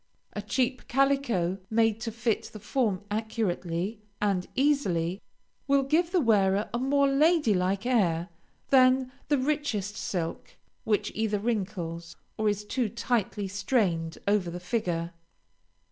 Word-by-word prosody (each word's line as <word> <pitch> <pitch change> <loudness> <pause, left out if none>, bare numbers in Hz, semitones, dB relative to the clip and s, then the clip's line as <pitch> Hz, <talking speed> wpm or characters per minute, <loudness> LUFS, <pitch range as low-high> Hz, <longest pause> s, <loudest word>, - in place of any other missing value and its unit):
A 205 - -3
cheap 250 +4 -1
calico 240 -9 +1
made 225 -1 +2
to 230 - -3
fit 225 -1 -1
the 215 - -10
form 210 -3 -1
accurately 210 -2 -2 0.2
and 195 -3 0
easily, 195 - +1 0.5
will 275 0 +4
give 320 +5 +2
the 365 - +3
wearer 205 - +3
a 235 - 0
more 280 +2 +3
lady 295 -2 +3
like 190 +3 0
air 180 -9 +2 0.4
than 255 -1 +5 0.2
the 290 - +3
richest 255 -8 -1
silk 170 -6 -4 0.3
which 210 -2 +1
either 220 -1 0
wrinkles 185 -6 -3 0.2
or 215 -1 +1
is 205 0 -2
too 240 0 -1
tightly 220 -3 -1
strained 185 -5 0
over 200 -3 +2
the 175 +1 -6
figure. 175 -3 -2
215 Hz, 130 wpm, -28 LUFS, 185-255 Hz, 0.5 s, than